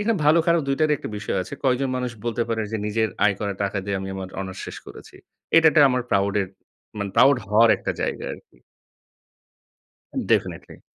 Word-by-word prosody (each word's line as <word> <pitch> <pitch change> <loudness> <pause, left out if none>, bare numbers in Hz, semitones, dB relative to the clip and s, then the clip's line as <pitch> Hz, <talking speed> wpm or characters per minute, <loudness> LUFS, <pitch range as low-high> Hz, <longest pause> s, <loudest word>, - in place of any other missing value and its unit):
এইখানে 220 +1 +1
ভালো 155 +3 +6
খারাপ 170 0 +4
দুইটারই 150 +2 +2
একটা - - -6
বিষয় 105 - -3
আছে। 90 - -12
কয়জন 130 +1 +2
মানুষ 125 -1 -2
বলতে 120 0 -1
পারে 115 -1 -1
যে 110 - 0
নিজের 110 +1 0 0.2
আয় 100 -1 +4
করা 100 -1 -1
টাকা 100 0 -1
দিয়ে 100 -1 -2
আমি 95 - -5
আমার 95 -1 -6
অনার্স 95 -1 -6
শেষ - - -7
করেছি। - - -12 0.4
এটা 165 - +7
একটা 150 - +5
আমার 125 0 0
প্রাউড 100 0 +1
এর - - -4 0.5
মানে 100 -1 -3
প্রাউড 140 0 +6
হওয়ার 110 +3 +5
একটা - - -3
জায়গা - - -3
আরকি। - - -14 1.7
definitely - - -1
115 Hz, 185 wpm, -23 LUFS, 100-135 Hz, 1.7 s, এটা